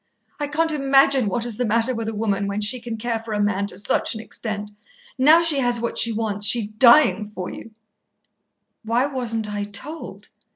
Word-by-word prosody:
I 290 - -2
can't 320 +3 0
imagine 275 -3 +3
what 230 +4 -2
is 235 -3 -5
the 250 - -1
matter 230 +4 +1
with 225 -2 -4
a 225 - -6
woman 200 -2 -1
when 200 +1 -3
she 215 +4 -1
can 230 -1 -6
care 230 0 -3
for 220 -1 -6
a - - -2
man 205 -1 0
to 190 - -7
such 205 +3 -1
an - - -6
extent. 215 -2 -6 0.4
Now 310 +6 +5
she 315 -4 +4
has 245 -2 0
what 235 0 -2
she 235 - +5
wants, 210 -2 -1
she's 220 -2 +3
dying 220 -1 +4
for 180 -1 -5
you." - - -10 1.1
"Why 230 +4 0
wasn't 230 -6 -3
I 205 0 -3
told?" 205 +11 -7
230 Hz, 200 wpm, -21 LUFS, 210-255 Hz, 1.1 s, Now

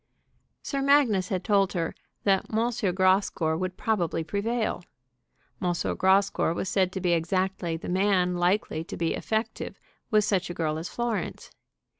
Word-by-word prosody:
Sir 275 -1 -2
Magnus 270 -10 +3
had 185 -2 -1
told 200 -2 +2
her 165 -3 -1 0.3
that 195 -2 +1
M. 225 -4 0
Grascour 185 -4 +2
would 185 +2 -3
probably 175 -7 0
prevail. 205 +2 -2 0.8
M. 180 - +1 0.2
Grascour 190 -3 +2
was 190 - -2
said 185 -2 +2
to 190 - -3
be 180 -1 +1
exactly 175 0 0
the - - -8
man 185 -1 +2
likely 175 -2 0
to - - -7
be 165 -1 0
effective 220 +1 -3 0.3
with 215 -2 +4
such 190 -3 0
a 175 - -5
girl 155 -2 -1
as 165 - -5
Florence. 235 -3 -3
190 Hz, 150 wpm, -27 LUFS, 175-210 Hz, 0.8 s, with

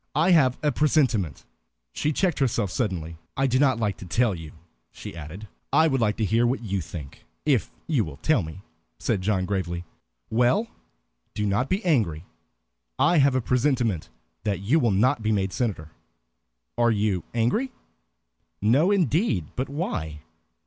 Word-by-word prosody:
"I 165 +5 +4
have 135 -7 +4
a 150 - +3
presentiment" 130 - +1 0.5
she 150 - 0
checked 175 0 0
herself 115 -7 +1
suddenly. 85 -9 -2 0.2
"I 135 - +2
do 130 -1 +2
not 135 -4 +3
like 105 -4 -1
to - - -9
tell 115 +3 +2
you," 80 -3 -8 0.4
she - - -9
added. 85 +6 -8 0.2
"I 160 +3 +5
would 135 -5 +1
like 105 -2 +1
to 110 - +1
hear 115 +5 +2
what 125 0 -1
you 100 -3 -2
think, 80 -3 -9 0.2
if 135 - +2 0.2
you 145 -9 +1
will 75 -6 -8
tell 130 - +2
me," 80 +3 -8 0.4
said 95 - -1
John, 95 -1 0
gravely. 90 -3 -3 0.5
"Well, 125 - +3 0.7
do 105 - -1
not 105 +7 0
be 195 +3 -1
angry. 95 - +1 0.7
I 175 -2 +4
have 135 -1 +4
a 130 - +2
presentiment 120 - 0 0.3
that 100 -2 -1
you 125 +12 +3
will 120 - +2
not 115 +6 +2
be 110 0 0
made 95 -3 0
senator. 95 -10 -2 0.9
Are 120 0 +4
you 105 -4 +1
angry?" 125 - +1 0.9
"No 130 - +3
indeed. 165 - +1
But 130 +2 -2
why?" 80 - -3
115 Hz, 165 wpm, -25 LUFS, 95-135 Hz, 0.9 s, I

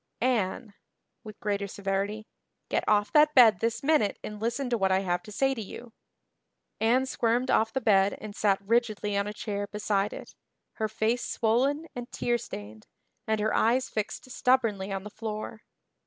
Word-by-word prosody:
"Anne," 225 -3 0 0.5
with 215 -2 -11
greater 200 -1 -1
severity, 200 +2 -3 0.4
"get - - 0
off 210 -1 +2
that 300 0 +5
bed 225 -8 +7
this 230 +3 -1
minute 285 -9 +2
and 210 0 -7
listen 240 +4 -1
to 245 - +1
what 195 -4 +1
I 190 0 +3
have 175 -2 -1
to 210 - -12
say 270 +5 +1
to 235 - -5
you." 225 +3 -9 0.9
Anne 245 +4 +3
squirmed 245 0 0
off 220 0 +3
the 265 - -2
bed 195 -3 +3
and 215 -1 -8
sat 200 -2 +2
rigidly 215 -2 +1
on 200 0 0
a - - -3
chair 205 -1 -4
beside 205 -1 -1
it, - - -9 0.4
her 220 - 0
face 225 +3 0
swollen 265 +7 +1
and 245 0 -7
tear 240 0 0
stained 105 - -9 0.4
and 220 0 +1
her 215 +1 0
eyes 245 +3 +2
fixed 215 +4 -4
stubbornly 230 -7 +1
on 195 -1 -3
the 210 - -9
floor. 220 0 -6
215 Hz, 175 wpm, -28 LUFS, 200-240 Hz, 0.9 s, bed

